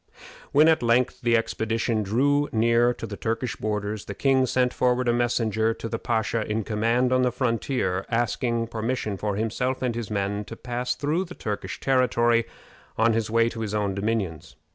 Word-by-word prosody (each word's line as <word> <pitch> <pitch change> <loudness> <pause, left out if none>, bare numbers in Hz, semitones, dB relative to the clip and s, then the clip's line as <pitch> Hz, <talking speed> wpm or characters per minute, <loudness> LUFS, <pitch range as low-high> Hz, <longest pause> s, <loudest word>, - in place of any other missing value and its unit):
When 150 +3 +6
at 160 -1 +4
length 120 +2 +2
the 120 -1 +3
expedition 115 0 -1
drew 140 +8 +1
near 115 +2 +3
to 120 - -6
the 105 -2 -6
Turkish 115 +2 -2
borders, 105 0 -3
the 100 - -6
king 130 +1 +2
sent 125 0 +1
forward 125 0 +1
a 120 - +3
messenger 115 -2 +1
to - - -6
the 115 0 -3
pasha 115 -1 0
in 110 +1 0
command 115 +4 +1
on 130 - +3
the 125 -1 +2
frontier, 115 -5 -1
asking 115 0 0
permission 115 -2 -2
for 105 +1 -2
himself 125 +5 -1
and 125 -2 0
his 115 -3 -5
men 100 0 -1
to 115 - -8
pass 125 +1 -3
through 155 +6 -1
the 180 - -10
Turkish 100 -3 -4
territory 120 -3 +2 0.5
on 115 +1 +3
his 110 -1 -1
way 115 +1 +3
to 115 - -8
his 105 -1 -3
own 100 -2 0
dominions. 100 -5 -3
115 Hz, 185 wpm, -25 LUFS, 110-125 Hz, 0.5 s, When